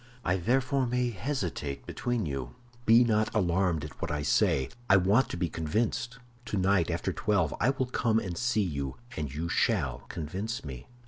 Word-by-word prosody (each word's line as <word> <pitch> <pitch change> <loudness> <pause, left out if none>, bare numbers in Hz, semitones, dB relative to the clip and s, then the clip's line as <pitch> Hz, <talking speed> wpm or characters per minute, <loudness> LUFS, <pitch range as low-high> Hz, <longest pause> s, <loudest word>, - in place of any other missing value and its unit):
I 90 +2 +2
therefore 130 +6 +1
may 125 0 0
hesitate 90 - -3
between 120 -4 -2
you. 65 -4 -4 0.3
Be 115 +2 +8
not 110 -2 +2
alarmed 90 -5 +1
at 75 - -11
what - - -2
I 75 0 -2
say; 65 -1 +2 0.2
I 95 - +8
want 100 +8 +3
to - - -4
be 90 0 0
convinced. 110 +10 -1 0.3
Tonight, 95 -5 +1
after - - -1
twelve, 95 -8 +1
I 120 - +3
will 135 -1 0
come 115 -3 +1
and 95 -6 -2
see 120 0 +1
you, 70 -7 -3 0.2
and 75 -3 -3
you 80 +4 -3
shall 85 - 0
convince 95 +7 -4
me." 65 -3 -7
95 Hz, 175 wpm, -29 LUFS, 75-115 Hz, 0.3 s, Be